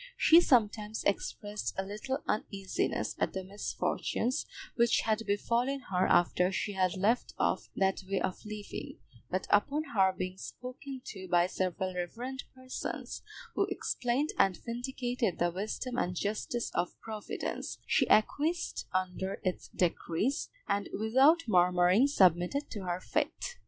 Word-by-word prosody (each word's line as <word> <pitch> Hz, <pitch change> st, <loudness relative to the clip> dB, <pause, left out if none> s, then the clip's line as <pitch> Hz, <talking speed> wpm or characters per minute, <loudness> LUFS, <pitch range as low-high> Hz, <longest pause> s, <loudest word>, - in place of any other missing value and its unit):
She 330 Hz, +2 st, +8 dB
sometimes 220 Hz, -6 st, +2 dB
expressed 205 Hz, +1 st, -2 dB
a 190 Hz, -, 0 dB
little 215 Hz, +8 st, -4 dB
uneasiness 195 Hz, -2 st, -1 dB
at -, -, 0 dB
the 190 Hz, -, -3 dB
misfortunes 210 Hz, +5 st, -2 dB, 0.3 s
which 235 Hz, -1 st, +4 dB
had 220 Hz, 0 st, +1 dB
befallen 240 Hz, +6 st, +1 dB
her 185 Hz, 0 st, +3 dB
after 180 Hz, +1 st, +3 dB
she 205 Hz, +2 st, -2 dB
had 185 Hz, -1 st, +1 dB
left 220 Hz, +6 st, +1 dB
off -, -, 0 dB
that 190 Hz, 0 st, +1 dB
way 195 Hz, -, +1 dB
of 185 Hz, -, -3 dB
living, 210 Hz, -1 st, -7 dB, 0.3 s
but 185 Hz, +1 st, -1 dB
upon 280 Hz, +9 st, +3 dB
her 190 Hz, -3 st, +5 dB
being 185 Hz, 0 st, -5 dB
spoken 255 Hz, +3 st, -8 dB
to 190 Hz, -2 st, -7 dB
by 175 Hz, 0 st, +5 dB
several 185 Hz, 0 st, -2 dB
reverend 240 Hz, +10 st, -4 dB
persons, 255 Hz, 0 st, -5 dB, 0.3 s
who -, -, +1 dB
explained 255 Hz, +5 st, -1 dB
and 190 Hz, -3 st, +4 dB
vindicated 245 Hz, -3 st, -2 dB
the 175 Hz, 0 st, +1 dB
wisdom 220 Hz, +7 st, -3 dB
and 180 Hz, -4 st, -1 dB
justice 215 Hz, +5 st, -2 dB
of 175 Hz, -, -2 dB
Providence, 215 Hz, -2 st, -5 dB
she -, -, +2 dB
acquiesced 310 Hz, +10 st, +2 dB
under 185 Hz, +1 st, -2 dB
its 185 Hz, -1 st, -2 dB
decrees, 180 Hz, -, 0 dB, 0.2 s
and 200 Hz, 0 st, 0 dB
without 265 Hz, +10 st, +5 dB
murmuring 180 Hz, +4 st, +5 dB
submitted 190 Hz, -, +3 dB
to 205 Hz, -4 st, -5 dB
her 175 Hz, 0 st, -1 dB
fate. 485 Hz, -, -2 dB
205 Hz, 135 wpm, -31 LUFS, 185-250 Hz, 0.3 s, She